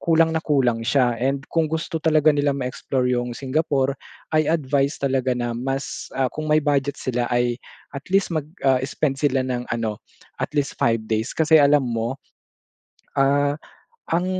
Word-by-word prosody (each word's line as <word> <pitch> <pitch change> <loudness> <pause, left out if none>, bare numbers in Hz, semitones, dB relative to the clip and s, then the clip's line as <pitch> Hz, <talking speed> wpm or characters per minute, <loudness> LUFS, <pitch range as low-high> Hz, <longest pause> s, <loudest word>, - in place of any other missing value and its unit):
kulang 165 -1 +3
na 160 - 0
kulang 130 -7 +1
siya 125 -1 +3
and 135 +2 0
kung 165 -2 +2
gusto 160 +1 -3
talaga 155 -1 +4
nila 145 -1 +1
ma-explore 130 0 -2
yung 120 -1 -2
Singapore, 140 -1 0 0.4
I 155 -1 +2
advise 140 -2 +1
talaga 130 -2 +1
na 120 -1 -2
mas, 135 +3 -4
ah, 135 -1 +2
kung 155 0 -5
may 155 +1 +4
budget 145 -1 0
sila 125 -1 -1
ay 120 0 +1 0.4
at 140 - -7
least 195 -2 +2
mag, 155 -3 -1 0.2
ah, 130 -2 +4
spend 135 0 -1
sila 140 -3 +2
ng 125 -1 -2
ano 110 -3 -2 0.4
at - - -1
least 140 -2 0
5 115 -1 +2
days 110 +2 -1
kasi 160 0 +5
alam 140 -1 +4
mo, 115 +1 -2 1.0
ah, 140 +1 +3 0.6
ang 175 +2 +1
135 Hz, 165 wpm, -22 LUFS, 125-155 Hz, 1.0 s, kasi